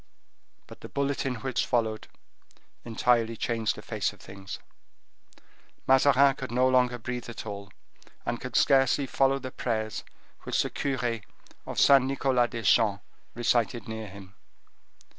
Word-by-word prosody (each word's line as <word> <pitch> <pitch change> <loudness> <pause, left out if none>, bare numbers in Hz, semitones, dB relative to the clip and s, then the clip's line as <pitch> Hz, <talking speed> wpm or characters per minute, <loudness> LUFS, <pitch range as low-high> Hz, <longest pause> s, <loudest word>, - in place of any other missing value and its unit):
But - - -14
the - - -9
bulletin 140 -2 -1
which 130 -2 -1
followed 110 -3 -1 0.8
entirely 115 0 +1
changed 115 -1 -1
the - - -10
face - - -1
of - - -18
things. 95 0 -9 1.3
Mazarin 135 +1 +5
could 130 -4 -6
no 125 +2 +3
longer 125 -1 +3
breathe 120 +1 -5
at 115 - -7
all, 100 -1 -7 0.6
and 120 0 -2
could 125 - -6
scarcely 135 0 +4
follow 135 +1 +2
the 130 -1 -7
prayers 110 -4 -3 0.4
which - - 0
the - - -4
cure 125 -4 -1 0.5
of - - -3
Saint 135 -2 +6
Nicholas 130 -2 +1
des 115 -2 -5
Champs 105 -1 +3 0.3
recited 120 -2 0
near 110 -1 -5
him. 95 0 -12
120 Hz, 140 wpm, -28 LUFS, 110-130 Hz, 1.3 s, Saint